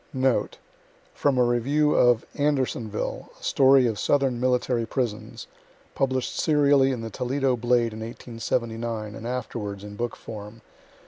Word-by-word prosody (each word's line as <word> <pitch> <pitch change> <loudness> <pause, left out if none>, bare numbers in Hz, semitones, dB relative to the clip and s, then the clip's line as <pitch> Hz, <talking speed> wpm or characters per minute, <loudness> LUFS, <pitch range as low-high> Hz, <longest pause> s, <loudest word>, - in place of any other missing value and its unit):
Note: 130 -1 +1 0.6
From 140 -3 +1
a 125 - +5
review 140 +6 +2
of 120 -2 +4
"ANDERSONVILLE, 130 -7 -2
A - - -19
STORY 135 -1 +5
OF 110 -4 -1
SOUTHERN 135 -4 +1
MILTTARY 125 -2 +1
PRISONS," 120 -4 -3 0.5
published 130 -2 -1
serially 145 -3 +4
in 125 -3 -3
the 115 0 -6
Toledo 130 +3 0
"Blade" 120 -1 +1
in 110 - -7
1879, 115 -1 -4
and 115 - -7
afterwards 110 -5 -4
in 105 0 -8
book 120 +2 -3
form. 105 +1 -9
120 Hz, 135 wpm, -25 LUFS, 115-130 Hz, 0.6 s, a